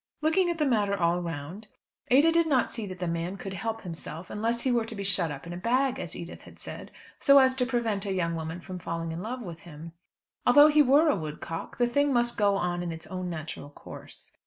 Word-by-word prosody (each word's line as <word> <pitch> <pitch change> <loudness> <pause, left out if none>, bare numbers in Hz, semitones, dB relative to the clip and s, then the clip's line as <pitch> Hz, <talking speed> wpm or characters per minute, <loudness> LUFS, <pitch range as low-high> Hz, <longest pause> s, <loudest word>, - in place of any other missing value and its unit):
Looking 350 +3 +3
at 340 - -1
the 305 - +1
matter 205 -6 +1
all 170 0 +2
round, 170 +5 -6 0.4
Ada 285 +6 +6
did 335 0 +3
not 265 -5 +2
see 225 -3 -3
that 185 -1 -7
the 180 - -3
man 170 +3 -2
could 195 -1 -6
help 225 +4 -3
himself 170 -1 -7
unless 230 +3 -1
he 260 - +1
were 240 -2 +2
to 225 0 -6
be 200 - -4
shut 185 -4 +2
up 140 0 -7
in 170 - -6
a - - -5
bag, 250 +6 +1
as 170 - -4
Edith 170 +1 -8
had - - -15
said, - - -8 0.3
so 280 -1 +6
as 260 -1 +6
to 250 -1 +1
prevent 225 -5 -1
a - - -1
young 170 -3 0
woman 165 +2 -5
from 185 0 -7
falling 165 -1 -4
in 165 +2 -5
love 245 +4 -5
with 170 -4 -8
him. 165 0 -10 0.5
Although 290 +5 +7
he 300 0 +5
were 290 +4 +5
a 295 - +4
"woodcock," 160 0 -6
the 245 - +3
thing 285 +4 +2
must 240 -1 +2
go 205 -2 +3
on 175 -2 -1
in 175 -1 -3
its 160 0 -7
own 185 -1 -5
natural 155 -3 -6
course. 145 - -10
200 Hz, 240 wpm, -28 LUFS, 170-250 Hz, 0.5 s, Although